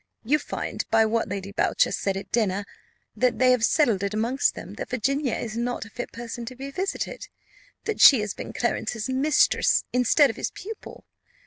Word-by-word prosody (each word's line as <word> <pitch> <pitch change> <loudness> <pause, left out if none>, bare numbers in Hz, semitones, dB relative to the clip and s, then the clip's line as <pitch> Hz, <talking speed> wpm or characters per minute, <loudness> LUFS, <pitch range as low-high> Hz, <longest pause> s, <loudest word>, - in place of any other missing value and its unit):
You 290 +7 +2
find, - - -4
by 225 0 +4
what 225 +1 0
Lady 200 0 -5
Boucher 200 - +1
said 195 -1 -1
at 195 -1 -8
dinner, 205 -3 0 0.5
that 250 -1 +1
they 255 0 +4
have 250 -3 +2
settled 235 - +3
it 200 +1 -2
amongst 235 +5 +1
them - - -8
that - - -5
Virginia 270 +2 0
is 225 -2 -5
not 240 0 -2
a 225 - -14
fit 245 +2 -6
person 235 0 -7
to 255 - -7
be 275 +2 -7
visited; 385 - -4 0.6
that 440 - -2
she 265 -6 +9
has 210 -1 -3
been - - -7
Clarence's 225 -1 -2
mistress 275 +4 +3
instead 250 +3 +4
of 225 - -15
his - - -2
pupil. 435 +4 -10
240 Hz, 190 wpm, -25 LUFS, 220-270 Hz, 0.6 s, she